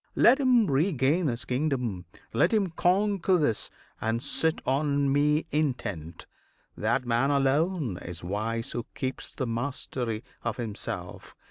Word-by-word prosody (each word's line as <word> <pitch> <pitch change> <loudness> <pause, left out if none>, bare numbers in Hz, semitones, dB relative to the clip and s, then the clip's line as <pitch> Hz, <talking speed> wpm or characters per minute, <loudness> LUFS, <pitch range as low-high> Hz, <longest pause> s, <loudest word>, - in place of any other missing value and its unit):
Let 255 +4 +6
him 250 -4 +4
regain 150 +1 +2
His 120 -2 -2
kingdom! 125 - -1 0.3
let 115 - +3
him 205 -5 +2
conquer 190 +1 +2
this, 145 -10 0 0.3
and 115 +1 0
sit 160 -1 +1
On 140 0 +1
Me 150 +2 +2
intent. 120 - -2 0.5
That 125 - 0
man 120 +3 +2
alone 140 - +1
is 85 0 -7
wise 110 +5 -2
Who 120 -1 -4
keeps 130 0 -3
the 130 - -3
mastery 120 -1 -3 0.2
of 115 -2 -2
himself! 110 -4 -5
135 Hz, 130 wpm, -28 LUFS, 115-160 Hz, 0.5 s, Let